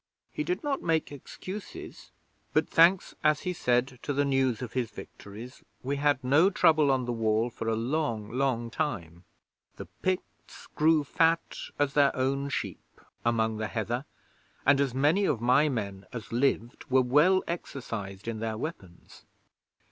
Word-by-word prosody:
He 305 Hz, -, -3 dB
did 360 Hz, +1 st, -2 dB
not 285 Hz, -2 st, -1 dB
make 160 Hz, -3 st, 0 dB
excuses; 185 Hz, +8 st, -9 dB, 0.4 s
but -, -, +2 dB
thanks, 175 Hz, +3 st, +4 dB
as 150 Hz, -1 st, +3 dB
he 180 Hz, -, -2 dB
said, 125 Hz, -4 st, 0 dB
to 145 Hz, -, -2 dB
the 145 Hz, +1 st, +1 dB
news 130 Hz, -3 st, +1 dB
of 115 Hz, -, -7 dB
his 125 Hz, -3 st, -1 dB
victories, 110 Hz, +5 st, -11 dB, 0.2 s
we 140 Hz, +2 st, -1 dB
had 145 Hz, -2 st, +1 dB
no 145 Hz, +9 st, +5 dB
trouble 155 Hz, -6 st, +4 dB
on 130 Hz, -2 st, +2 dB
the 120 Hz, -, -2 dB
Wall 115 Hz, +1 st, +1 dB
for 115 Hz, -1 st, -6 dB
a 110 Hz, -, +1 dB
long, 115 Hz, -3 st, -2 dB
long 125 Hz, -2 st, -1 dB
time. 90 Hz, -, -4 dB, 0.5 s
The -, -, -8 dB, 0.2 s
Picts 185 Hz, 0 st, -4 dB
grew 155 Hz, 0 st, +3 dB
fat 165 Hz, +3 st, +1 dB, 0.2 s
as 145 Hz, -1 st, +1 dB
their 140 Hz, -1 st, +4 dB
own 135 Hz, +2 st, 0 dB
sheep -, -, -5 dB, 0.2 s
among 110 Hz, -2 st, +1 dB
the 110 Hz, 0 st, -2 dB
heather, 120 Hz, +5 st, -3 dB, 0.6 s
and 140 Hz, 0 st, +5 dB
as 135 Hz, -3 st, 0 dB
many 155 Hz, +9 st, +3 dB
of 130 Hz, -, +1 dB
my 130 Hz, +6 st, +4 dB
men 100 Hz, -6 st, -4 dB
as 115 Hz, -3 st, -8 dB
lived 120 Hz, -1 st, 0 dB
were 130 Hz, 0 st, +4 dB
well 150 Hz, +10 st, +4 dB
exercised 115 Hz, -, -5 dB
in 115 Hz, -2 st, -3 dB
their 110 Hz, -1 st, -3 dB
weapons. 100 Hz, -, -8 dB
130 Hz, 160 wpm, -28 LUFS, 115-150 Hz, 0.6 s, no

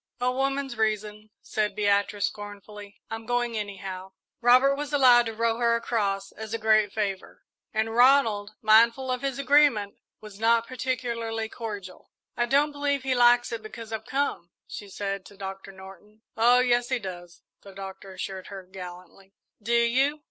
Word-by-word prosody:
"A 250 Hz, +1 st, +1 dB
woman's 270 Hz, -1 st, -2 dB
reason," 215 Hz, 0 st, -2 dB
said 210 Hz, -2 st, -2 dB
Beatrice, 205 Hz, 0 st, +1 dB
scornfully. 205 Hz, 0 st, -9 dB
"I'm 225 Hz, 0 st, -6 dB
going, 240 Hz, -1 st, 0 dB
anyhow." 195 Hz, -2 st, -6 dB, 0.3 s
Robert 255 Hz, +3 st, +5 dB
was 290 Hz, +1 st, -5 dB
allowed 250 Hz, -4 st, +6 dB
to 225 Hz, -, -5 dB
row 230 Hz, 0 st, 0 dB
her 235 Hz, -1 st, +2 dB
across, 200 Hz, -4 st, -1 dB
as 220 Hz, 0 st, -6 dB
a -, -, -1 dB
great 215 Hz, -2 st, +3 dB
favour; 200 Hz, -3 st, -4 dB, 0.3 s
and 220 Hz, 0 st, -1 dB
Ronald, 235 Hz, -5 st, +4 dB
mindful 230 Hz, +4 st, +4 dB
of 250 Hz, -1 st, -2 dB
his 275 Hz, -2 st, -2 dB
agreement, 275 Hz, -7 st, +3 dB, 0.2 s
was 210 Hz, -2 st, -12 dB
not 230 Hz, +1 st, +3 dB
particularly 235 Hz, -3 st, -3 dB
cordial. 205 Hz, -6 st, -8 dB, 0.3 s
"I 240 Hz, -, 0 dB
don't 285 Hz, +3 st, +3 dB
believe 285 Hz, -2 st, -1 dB
he 265 Hz, -1 st, 0 dB
likes 240 Hz, 0 st, +4 dB
it 230 Hz, -1 st, -4 dB
because 225 Hz, +1 st, -9 dB
I've 220 Hz, +1 st, -5 dB
come," 270 Hz, -11 st, -2 dB, 0.2 s
she 205 Hz, -, -9 dB
said, 195 Hz, 0 st, -4 dB
to 200 Hz, -, -16 dB
Doctor 195 Hz, 0 st, -7 dB
Norton. 195 Hz, +3 st, -15 dB
"Oh, 240 Hz, +2 st, +5 dB
yes, 245 Hz, -1 st, +1 dB
he 255 Hz, -, +1 dB
does," 175 Hz, -5 st, -9 dB, 0.2 s
the 200 Hz, -, -13 dB
Doctor 195 Hz, 0 st, -9 dB
assured 190 Hz, 0 st, -6 dB
her, 195 Hz, -2 st, -8 dB
gallantly. 185 Hz, +1 st, -12 dB, 0.3 s
"Do 225 Hz, +3 st, -4 dB
you?" 260 Hz, +6 st, +2 dB
220 Hz, 165 wpm, -26 LUFS, 200-245 Hz, 0.3 s, allowed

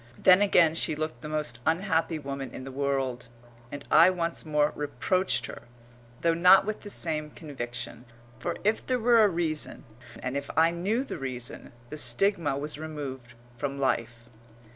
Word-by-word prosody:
Then 185 Hz, +1 st, +6 dB
again 175 Hz, -6 st, +5 dB
she 160 Hz, -1 st, 0 dB
looked 155 Hz, -5 st, -4 dB
the 150 Hz, -, -7 dB
most 150 Hz, -7 st, -2 dB
unhappy 165 Hz, 0 st, +1 dB
woman 140 Hz, -2 st, -5 dB
in -, -, -7 dB
the 135 Hz, -, -7 dB
world, 135 Hz, -3 st, -2 dB, 0.4 s
and 145 Hz, -1 st, -7 dB
I -, -, +8 dB
once 170 Hz, -2 st, -2 dB
more 150 Hz, -1 st, +1 dB
reproached 150 Hz, +7 st, 0 dB
her, -, -, -8 dB, 0.6 s
though 165 Hz, 0 st, +3 dB
not 180 Hz, +3 st, +6 dB
with 215 Hz, 0 st, -4 dB
the 205 Hz, -, -9 dB
same 155 Hz, -5 st, -1 dB
conviction, 125 Hz, -5 st, -7 dB, 0.3 s
for 175 Hz, -, -3 dB
if 215 Hz, +2 st, +1 dB
there 255 Hz, -, 0 dB
were 235 Hz, -1 st, +5 dB
a -, -, +6 dB
reason, 165 Hz, -3 st, -2 dB, 0.3 s
and 125 Hz, +2 st, -4 dB
if 140 Hz, 0 st, -3 dB
I 165 Hz, +1 st, +5 dB
knew 200 Hz, +9 st, -1 dB
the -, -, -6 dB
reason, 125 Hz, -2 st, -6 dB, 0.2 s
the 155 Hz, -, -5 dB
stigma 145 Hz, -, +1 dB
was 150 Hz, +1 st, -3 dB
removed 135 Hz, -6 st, -7 dB, 0.2 s
from 140 Hz, +2 st, -3 dB
life. 120 Hz, -3 st, -1 dB
150 Hz, 165 wpm, -28 LUFS, 135-175 Hz, 0.6 s, I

